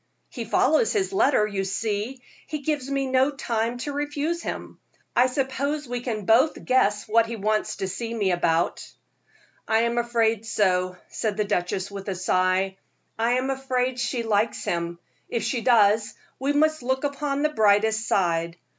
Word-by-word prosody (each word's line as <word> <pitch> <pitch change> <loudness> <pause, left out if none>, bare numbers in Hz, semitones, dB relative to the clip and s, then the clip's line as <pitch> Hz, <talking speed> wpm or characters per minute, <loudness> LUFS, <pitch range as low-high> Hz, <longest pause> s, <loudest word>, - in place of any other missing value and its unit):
"He 235 -3 -6
follows 310 - +3
his 395 -2 0
letter, 290 - +3
you 200 -2 -2
see; 215 +5 -3 0.2
he 305 -2 -4
gives 290 -3 -1
me 275 -1 0
no 260 +1 +3
time 235 -4 -2
to 290 +4 -4
refuse 295 +3 -2
him. - - -6 0.4
I 245 +1 +5
suppose 275 +2 -2
we 245 0 -3
can 220 -5 -4
both 250 +9 +3
guess 210 -5 +2
what 225 +1 +3
he 230 - -4
wants 215 0 -1
to 190 - -3
see 225 +5 -4
me 205 -5 0
about." 170 -1 +1 0.8
"I 220 0 +3
am 235 +1 +1
afraid 230 -2 +1
so," 185 -4 +1
said 215 -3 -2
the 210 - +2
duchess, 190 -1 -1
with 200 0 -7
a 190 - -2
sigh. 185 +1 +1 0.4
"I 230 +2 +2
am 255 +2 0
afraid 260 -1 -1
she 245 -1 -1
likes 215 0 0
him. 170 0 -2 0.3
If 230 - -2
she 245 - -1
does, 215 -3 +3 0.2
we 275 +2 0
must 310 +1 +2
look 260 +2 -1
upon 285 0 -1
the 305 - +3
brightest 220 -3 +2
side. 170 -2 0
230 Hz, 170 wpm, -25 LUFS, 205-270 Hz, 0.8 s, I